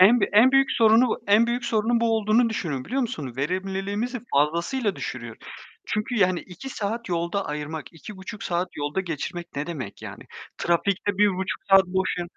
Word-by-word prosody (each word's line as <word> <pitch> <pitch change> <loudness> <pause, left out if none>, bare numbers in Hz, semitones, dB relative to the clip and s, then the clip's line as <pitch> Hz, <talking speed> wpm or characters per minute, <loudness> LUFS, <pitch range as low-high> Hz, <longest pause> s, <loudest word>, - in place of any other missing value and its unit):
En 220 +6 +7
b - - +4
en 240 +6 +6
büyük 270 0 +4
sorunu 225 +1 +4
en 210 +3 +5
büyük 240 0 -1
sorunun 230 +2 +1
bu 230 -1 +2
olduğunu 220 +2 +3
düşünüyorum, 150 -11 -3
biliyor 270 +3 -1
musun? 145 - -5
Verimliliğimizi 195 - -2
fazlasıyla 170 - +1
düşürüyor. 120 -3 -6 0.5
Çünkü 215 +4 -2
yani 185 -2 +3
2 195 +9 -10
saat 230 0 -4
yolda 170 +3 -1
ayırmak, 150 +1 -5
2,5 190 +4 -9
saat 175 +1 -1
yolda 145 +5 -2
geçirmek 170 0 -4
ne 145 +3 -2
demek 130 - -6
yani? - - -8 0.4
Trafikte 195 +3 0
1,5 190 -2 +1
saat 195 -1 +7
boşa 185 -1 -1
195 Hz, 160 wpm, -25 LUFS, 170-225 Hz, 0.5 s, En